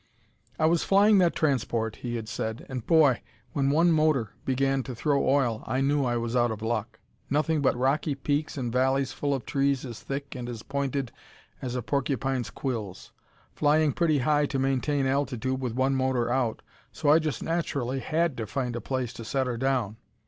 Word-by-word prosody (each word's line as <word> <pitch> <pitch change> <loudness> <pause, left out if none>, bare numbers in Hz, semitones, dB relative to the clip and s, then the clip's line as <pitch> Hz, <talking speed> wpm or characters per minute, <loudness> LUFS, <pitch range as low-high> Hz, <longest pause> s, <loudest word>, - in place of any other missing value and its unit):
"I 155 - +2
was 165 +1 +3
flying 200 +1 +5
that 175 -2 +3
transport," 120 -7 0
he 120 -1 -4
had 110 -2 -4
said, 110 -2 -4
"and, 130 -3 -5
boy! 150 -7 +5 0.3
when 140 -1 +1
one 165 +4 +4
motor 155 -8 +2
began 135 +1 +1
to 130 -1 -7
throw 140 +3 +1
oil 125 -6 +1
I 130 +3 0
knew 140 +1 +2
I 120 -1 0
was 115 +1 -2
out 120 -1 +3
of 110 -1 -5
luck. 110 -1 -2 0.3
Nothing 150 +2 +1
but 130 -3 +2
rocky 140 +3 +1
peaks 145 +2 -2
and 120 -3 -3
valleys 130 +1 +1
full 145 - -2
of 135 -5 -2
trees 140 -1 0
as 120 -3 -7
thick 140 0 -5
and 125 -3 -6
as 115 -2 -6
pointed 140 -2 -2 0.5
as 125 -1 -4
a 125 - -2
porcupine's 135 -2 -1
quills. 110 -8 -5 0.4
Flying 150 -1 +3
pretty 160 -3 +2
high 145 +2 +2
to 140 - -2
maintain 135 +1 +1
altitude 130 -1 -1
with 120 -3 -3
one 130 +1 +2
motor 130 -3 +1
out, 125 -4 -1 0.3
so 145 - -1
I 155 +2 +7
just 155 -3 -3
naturally 140 -6 -1
had 160 +2 0
to 110 -2 -4
find 125 0 -2
a 120 - -3
place 130 -3 -3
to 115 - -8
set 135 +3 -1
her 125 -1 -2
down. 125 -5 0
135 Hz, 190 wpm, -27 LUFS, 120-145 Hz, 0.5 s, I